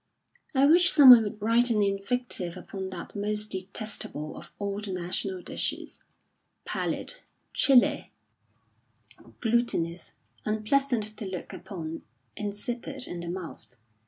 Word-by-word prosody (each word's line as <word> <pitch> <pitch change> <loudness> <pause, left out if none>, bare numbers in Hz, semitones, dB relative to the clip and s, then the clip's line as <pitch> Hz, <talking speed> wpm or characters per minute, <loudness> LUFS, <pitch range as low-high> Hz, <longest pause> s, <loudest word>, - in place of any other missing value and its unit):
I 270 +1 +5
wish 345 +5 +6
someone 255 -6 +10
would 215 0 -4
write 230 +3 +3
an 215 -3 +3
invective 200 -2 -1
upon 190 -1 -6
that 185 +1 -8
most 210 +1 -1
detestable 190 -5 -4
of - - -11
all 200 0 -3
the 205 -2 -5
national 180 +1 -3
dishes, - - -4 0.6
pallid, - - -2 0.4
chilly, 265 -3 +4 1.3
glutinous, 220 -8 0 0.3
unpleasant 220 +3 +1
to 215 - -5
look 185 -2 -6
upon, 165 -5 -7 0.3
insipid 240 +6 -5
in 175 - -6
the 170 0 -6
mouth. 180 -1 -7
210 Hz, 115 wpm, -28 LUFS, 185-240 Hz, 1.3 s, someone